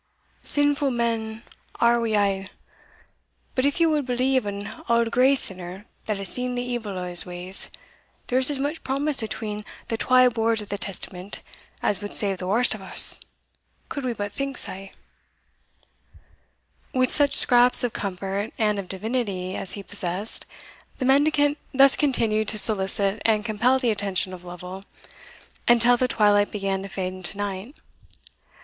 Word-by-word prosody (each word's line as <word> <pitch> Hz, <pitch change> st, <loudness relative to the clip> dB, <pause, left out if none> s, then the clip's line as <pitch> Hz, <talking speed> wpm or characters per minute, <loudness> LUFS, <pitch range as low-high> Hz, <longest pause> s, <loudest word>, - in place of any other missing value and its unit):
Sinfu' 290 Hz, -1 st, +2 dB
men 230 Hz, -2 st, -3 dB, 0.4 s
are 235 Hz, 0 st, +3 dB
we 220 Hz, -2 st, 0 dB
a'; 195 Hz, -1 st, -1 dB, 1.0 s
but 255 Hz, -, 0 dB
if 285 Hz, +5 st, 0 dB
ye 335 Hz, -, +4 dB
wad 305 Hz, -3 st, +1 dB
believe 255 Hz, -1 st, 0 dB
an 200 Hz, 0 st, -5 dB, 0.2 s
auld 235 Hz, -1 st, +2 dB
grey 260 Hz, +3 st, +4 dB
sinner 185 Hz, -4 st, -1 dB, 0.2 s
that 215 Hz, -2 st, -2 dB
has 195 Hz, 0 st, +2 dB
seen 250 Hz, +4 st, +1 dB
the 245 Hz, -, -2 dB
evil 235 Hz, -6 st, -5 dB
o' 180 Hz, -, -4 dB
his 175 Hz, -1 st, +3 dB
ways, 180 Hz, +1 st, -1 dB, 0.6 s
there 255 Hz, -, 0 dB
is 260 Hz, -, +4 dB
as 290 Hz, -, -1 dB
much 290 Hz, +4 st, -4 dB
promise 275 Hz, +1 st, -1 dB
atween 210 Hz, -1 st, -5 dB, 0.3 s
the 225 Hz, -, -1 dB
twa 255 Hz, +2 st, +4 dB
boards 225 Hz, -1 st, 0 dB
o' 210 Hz, -, -5 dB
the 200 Hz, -, -5 dB
Testament 190 Hz, 0 st, -4 dB, 0.4 s
as 200 Hz, -1 st, 0 dB
wad 205 Hz, -, +1 dB
save 195 Hz, -3 st, +4 dB
the 180 Hz, -, -5 dB
warst 230 Hz, +4 st, +2 dB
o' -, -, -10 dB
us, 190 Hz, -, +8 dB, 0.7 s
could 280 Hz, -, -5 dB
we 250 Hz, -2 st, -2 dB
but 205 Hz, -2 st, -5 dB
think 275 Hz, -1 st, -4 dB
sae." 195 Hz, +1 st, -4 dB, 2.0 s
With 255 Hz, -1 st, +2 dB
such 285 Hz, -2 st, +3 dB
scraps 245 Hz, 0 st, +4 dB
of 245 Hz, -, -1 dB
comfort 195 Hz, +2 st, -4 dB
and 210 Hz, -2 st, 0 dB
of 195 Hz, -, -6 dB
divinity 195 Hz, -3 st, -3 dB
as 190 Hz, -, -5 dB
he 200 Hz, -, -7 dB
possessed, 185 Hz, +4 st, -4 dB, 0.5 s
the 260 Hz, -, -3 dB
mendicant 290 Hz, +2 st, +2 dB, 0.2 s
thus 275 Hz, 0 st, +6 dB
continued 225 Hz, -7 st, 0 dB
to 215 Hz, -, -1 dB
solicit 200 Hz, -1 st, +1 dB
and 215 Hz, -1 st, +1 dB
compel 235 Hz, +4 st, +2 dB
the 250 Hz, -3 st, 0 dB
attention 195 Hz, -3 st, -2 dB
of 180 Hz, -1 st, -10 dB
Lovel, 180 Hz, +2 st, -9 dB, 0.8 s
until 240 Hz, +1 st, +5 dB
the 255 Hz, +1 st, 0 dB
twilight 205 Hz, -3 st, +2 dB
began 195 Hz, -2 st, -3 dB
to 195 Hz, -, -8 dB
fade 185 Hz, -1 st, -4 dB
into 185 Hz, +1 st, -2 dB
night. 205 Hz, +6 st, -5 dB
220 Hz, 160 wpm, -24 LUFS, 195-250 Hz, 2.0 s, us